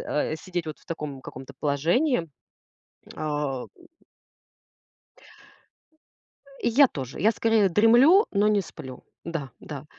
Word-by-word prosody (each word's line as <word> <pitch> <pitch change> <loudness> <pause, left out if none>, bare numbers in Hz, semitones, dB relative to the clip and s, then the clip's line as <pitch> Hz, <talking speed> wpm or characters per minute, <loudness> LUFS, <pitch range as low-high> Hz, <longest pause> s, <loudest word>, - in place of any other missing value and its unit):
э, 150 +1 -2
сидеть 175 +1 -5
вот 155 - -6
в - - -25
таком 150 -5 -6
каком-то 130 0 -10
положении. 165 - +1 0.9
Ам. 145 -4 -3 3.0
Э, - - 0
я 265 +4 +6
тоже. 135 - -7
Я 220 +3 +4
скорее 225 -3 +2
дремлю, 240 - +6
но 205 +1 +2
не 210 -1 +3
сплю. 130 -7 -10 0.2
Да, 165 -5 -5
да. 145 -2 -8
165 Hz, 115 wpm, -25 LUFS, 145-220 Hz, 3.0 s, я